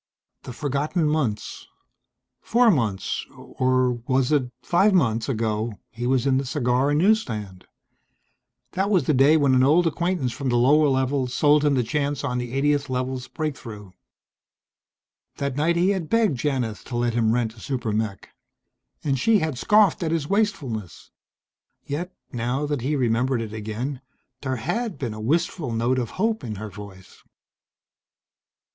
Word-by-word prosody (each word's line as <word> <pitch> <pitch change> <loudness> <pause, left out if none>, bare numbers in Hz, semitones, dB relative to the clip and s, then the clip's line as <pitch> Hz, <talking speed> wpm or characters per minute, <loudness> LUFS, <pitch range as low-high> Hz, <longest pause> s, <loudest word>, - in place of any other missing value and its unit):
The - - -8
forgotten 145 +5 -1
months. 135 -9 -2 0.7
Four 235 0 +4
months, 110 - -1
or 130 -1 0
was 130 +1 +1
it 135 -5 +2
five 190 +3 +3
months, 115 -9 +1
ago, 110 -2 -1 0.2
he 120 +2 -4
was 130 0 +1
in 135 -1 +3
the - - -2
cigar 125 0 +1
and 145 - +2
news 215 +7 +4
stand. 105 - -7 1.1
That 195 +2 -1
was 190 -5 +3
the 155 - +1
day 140 +4 +5
when 140 -3 +3
an 130 - +4
old 160 +6 +4
acquaintance 170 -5 0
from 130 +2 -3
the 120 - +1
lower 145 +5 +5
levels 130 -1 0
sold 150 0 +4
him 145 -2 +3
the 125 - +2
chance 145 +2 -2
on 125 0 -1
the 120 -1 -5
80th 145 0 +1
Level's 130 0 -3
breakthrough. 115 - -6 1.5
That 140 -2 -2
night 160 +4 +1
he 175 +3 +3
had 185 -6 -3
begged 220 - +2
Janith 125 -7 -2
to 120 - -4
let 120 -1 0
him 115 -2 +2
rent 115 -2 0
a 115 - -16
super 125 -3 -3
mech. 105 -2 -3 0.7
And 135 -3 0
she 225 - +4
had 160 -6 -1
scoffed 200 - +3
at 165 - 0
his 160 -3 -1
wastefulness. 150 - -2 0.7
Yet, 170 +6 -4 0.2
now 125 +3 -2
that 145 -3 -2
he 145 +5 0
remembered 125 0 +1
it 110 -2 -5
again, 110 +6 -4 0.4
there 130 -2 -2
had 220 - -3
been 120 -5 -4
a 110 - -7
wistful 150 - -1
note 120 +3 +1
of 120 -3 -3
hope 220 +3 0
in 110 -3 -5
her 105 +1 -7
voice. 95 -2 -12
130 Hz, 165 wpm, -24 LUFS, 120-155 Hz, 1.5 s, day